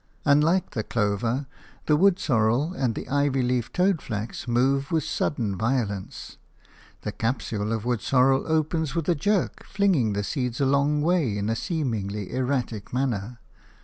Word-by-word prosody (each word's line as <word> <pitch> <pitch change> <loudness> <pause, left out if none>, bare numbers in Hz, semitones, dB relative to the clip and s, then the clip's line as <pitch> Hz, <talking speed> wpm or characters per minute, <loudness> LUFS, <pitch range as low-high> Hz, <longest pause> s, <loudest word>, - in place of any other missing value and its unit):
Unlike 155 +6 +3
the 110 - -2
clover, 115 +5 -1 0.4
the 150 - +4
wood 185 +3 +4
sorrel 120 +6 +1
and 130 - -1
the - - -6
ivy 140 -1 +1
leaved 125 -2 -1
toadflax 135 - -1
move 135 +3 +1
with 160 -2 +1
sudden 110 -8 -1
violence. 110 -3 -3 0.6
The - - -2
capsule 115 -3 -2
of 115 -1 -2
wood 120 -3 0
sorrel 135 0 +3
opens 160 -1 0
with 165 -3 -1
a - - +5
jerk, 195 +5 0
flinging 185 - +1
the 100 +1 -1
seeds 125 0 -2
a 140 - +2
long 140 +2 +2
way 160 - +1
in 105 +2 -1
a - - 0
seemingly 110 - -3
erratic 125 -5 -2
manner. 120 -3 -2
130 Hz, 150 wpm, -25 LUFS, 115-150 Hz, 0.6 s, a